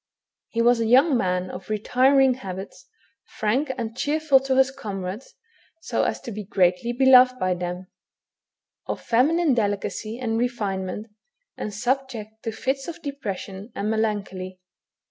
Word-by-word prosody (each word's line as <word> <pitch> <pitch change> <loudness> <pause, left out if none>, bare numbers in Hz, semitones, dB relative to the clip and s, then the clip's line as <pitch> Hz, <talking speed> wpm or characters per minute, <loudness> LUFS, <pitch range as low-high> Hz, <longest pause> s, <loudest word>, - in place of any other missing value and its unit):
He 230 0 0
was 240 0 +4
a 225 - 0
young 265 +5 +5
man 180 -4 0
of 180 +2 -9
retiring 260 +5 +3
habits, 195 -5 -8 0.5
frank 255 +7 +1
and 230 -2 -4
cheer 295 +4 0
ful 295 -4 +5
to 265 0 -1
his 265 0 +4
comrades, 205 -4 -6 0.4
so - - -1
as - - -1
to 235 - -7
be 210 0 -5
greatly 185 +3 +1
beloved 255 0 +6
by 185 -5 +1
them, 180 +1 -4 1.0
of - - -3
feminine 295 +6 +2
delicacy 215 0 -2
and 230 -3 -1
refinement, 205 -5 -2 0.5
and 210 - -5
subject 230 -1 -3
to 225 - -3
fits 265 +4 -2
of 340 0 -8
depression 205 - -6
and 210 +2 -1
melancholy. 195 -4 -2
225 Hz, 145 wpm, -24 LUFS, 200-265 Hz, 1.0 s, beloved